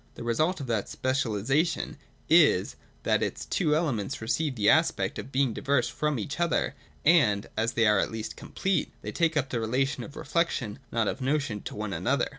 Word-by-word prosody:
The -, -, -7 dB
result 155 Hz, +10 st, +1 dB
of 140 Hz, -, -4 dB
that 115 Hz, -5 st, -1 dB
speciali 130 Hz, -6 st, -1 dB
sation 155 Hz, +6 st, +1 dB, 0.3 s
is, 155 Hz, -, +4 dB, 0.3 s
that -, -, +2 dB
its -, -, -2 dB
two 150 Hz, -1 st, +1 dB
elements 135 Hz, -, -1 dB
receive 130 Hz, +5 st, -1 dB
the 105 Hz, -3 st, 0 dB
aspect -, -, +3 dB
of 135 Hz, -, -8 dB
being 130 Hz, -3 st, +1 dB
diverse 130 Hz, -2 st, +1 dB
from 150 Hz, +4 st, -1 dB
each 140 Hz, +8 st, -4 dB
other, 170 Hz, -4 st, +1 dB, 0.3 s
and, 130 Hz, -12 st, +4 dB
as 115 Hz, +2 st, 0 dB
they 115 Hz, -, +3 dB
are 105 Hz, -2 st, +4 dB
at -, -, +1 dB
least 110 Hz, -1 st, -5 dB
complete, 190 Hz, -4 st, -1 dB
they -, -, -4 dB
take 165 Hz, -2 st, +1 dB
up 135 Hz, -1 st, 0 dB
the 120 Hz, -, 0 dB
relation 130 Hz, +5 st, 0 dB
of 150 Hz, -, -10 dB
'reflection,' 135 Hz, -10 st, -1 dB
not 115 Hz, -2 st, +1 dB
of 130 Hz, -, -3 dB
'notion,' 135 Hz, -6 st, -1 dB
to -, -, -7 dB
one 105 Hz, -1 st, -4 dB
another. 120 Hz, +10 st, 0 dB
130 Hz, 195 wpm, -28 LUFS, 110-150 Hz, 0.3 s, is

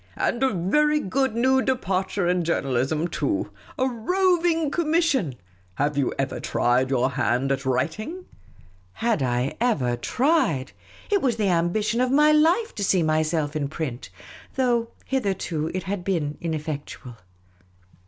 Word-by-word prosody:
" 95 Hz, -, -28 dB
And 240 Hz, -, -1 dB
a 265 Hz, -, +4 dB
very 300 Hz, -, +2 dB
good 265 Hz, +1 st, 0 dB
new 260 Hz, +3 st, +3 dB
departure 195 Hz, -7 st, -1 dB
in 180 Hz, 0 st, +1 dB
journalism 150 Hz, 0 st, 0 dB
too! 310 Hz, -, -2 dB, 0.3 s
A 260 Hz, -, +2 dB
roving 330 Hz, -, +1 dB
commission! 310 Hz, -, +1 dB, 0.4 s
Have 145 Hz, +5 st, 0 dB
you 140 Hz, -3 st, +1 dB
ever 135 Hz, -, -2 dB
tried 125 Hz, +2 st, +1 dB
your 130 Hz, 0 st, +1 dB
hand 130 Hz, 0 st, 0 dB
at 135 Hz, 0 st, -2 dB
writing? 215 Hz, -, -2 dB, 0.2 s
' 90 Hz, -, -26 dB
' 90 Hz, 0 st, -33 dB
Had 230 Hz, -9 st, +2 dB
I 125 Hz, +2 st, 0 dB
ever 140 Hz, -, +1 dB
tried! 250 Hz, -, +1 dB, 0.4 s
It 400 Hz, -2 st, +3 dB
was 250 Hz, -4 st, +1 dB
the 210 Hz, -3 st, 0 dB
ambition 195 Hz, +7 st, +1 dB
of 255 Hz, -, +2 dB
my 300 Hz, +3 st, +5 dB
life 335 Hz, +9 st, +3 dB
to 205 Hz, -, -4 dB
see 185 Hz, -3 st, +2 dB
myself 155 Hz, -1 st, 0 dB
in 145 Hz, -2 st, -1 dB
print; 140 Hz, -5 st, -5 dB, 0.5 s
though, 240 Hz, -3 st, +1 dB, 0.2 s
hitherto, 190 Hz, -, -1 dB
it 185 Hz, -, -3 dB
had 195 Hz, -1 st, -3 dB
been 160 Hz, -6 st, -1 dB
ineffectual. 150 Hz, -6 st, -5 dB
185 Hz, 150 wpm, -24 LUFS, -, 0.5 s, my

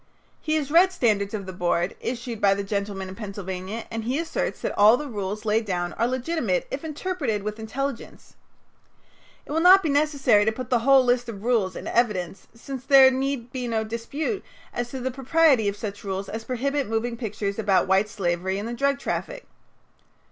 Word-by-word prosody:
He 310 Hz, 0 st, 0 dB
has 290 Hz, -2 st, -1 dB
read 360 Hz, +4 st, +6 dB
"Standards 215 Hz, -, +1 dB
of 200 Hz, -2 st, -5 dB
the 185 Hz, -, -7 dB
Board," 175 Hz, 0 st, 0 dB
issued 235 Hz, -2 st, -5 dB
by 195 Hz, -1 st, +4 dB
the 200 Hz, -, -3 dB
gentlemen 200 Hz, -1 st, -3 dB
in 185 Hz, -, -8 dB
Pennsylvania, 195 Hz, +1 st, -6 dB
and 225 Hz, -1 st, -3 dB
he 250 Hz, +5 st, -1 dB
asserts 330 Hz, 0 st, -2 dB
that -, -, -3 dB
all 215 Hz, +4 st, +6 dB
the 300 Hz, -, -5 dB
rules 210 Hz, -2 st, -4 dB
laid 220 Hz, +1 st, +2 dB
down 175 Hz, -4 st, -2 dB
are 230 Hz, -, 0 dB
legitimate 330 Hz, -, -1 dB
if -, -, -4 dB
interpreted 305 Hz, -, -3 dB
with 210 Hz, +1 st, -4 dB
intelligence. 250 Hz, +3 st, -5 dB, 1.1 s
It -, -, -10 dB
will 315 Hz, -, +1 dB
not 370 Hz, +3 st, +7 dB
be 320 Hz, -, 0 dB
necessary 280 Hz, -7 st, +3 dB
to 220 Hz, -, +2 dB
put 250 Hz, +2 st, -7 dB
the 245 Hz, -, +4 dB
whole 265 Hz, +2 st, +5 dB
list 245 Hz, -1 st, +1 dB
of 205 Hz, -3 st, -8 dB
rules 220 Hz, -7 st, +1 dB
in -, -, -7 dB
evidence 195 Hz, -6 st, -1 dB
since 260 Hz, +2 st, -7 dB
there 270 Hz, -1 st, +7 dB
need 260 Hz, -2 st, -2 dB
be 250 Hz, -2 st, -4 dB
no 225 Hz, -2 st, 0 dB
dispute 255 Hz, -, -4 dB, 0.3 s
as 240 Hz, 0 st, -3 dB
to 265 Hz, -, -6 dB
the 260 Hz, +1 st, -2 dB
propriety 270 Hz, -2 st, +3 dB
of 200 Hz, -, -6 dB
such 205 Hz, -1 st, -6 dB
rules 195 Hz, 0 st, -4 dB
as 225 Hz, +1 st, -6 dB
prohibit 275 Hz, +1 st, -1 dB
moving 230 Hz, +2 st, -1 dB
pictures 210 Hz, -3 st, -4 dB
about 200 Hz, -3 st, +3 dB
white 190 Hz, +3 st, +3 dB
slavery 190 Hz, -1 st, -1 dB
and 205 Hz, +3 st, -4 dB
the 235 Hz, -, -4 dB
drug 275 Hz, +3 st, +1 dB
traffic. -, -, -4 dB
230 Hz, 195 wpm, -25 LUFS, 205-275 Hz, 1.1 s, not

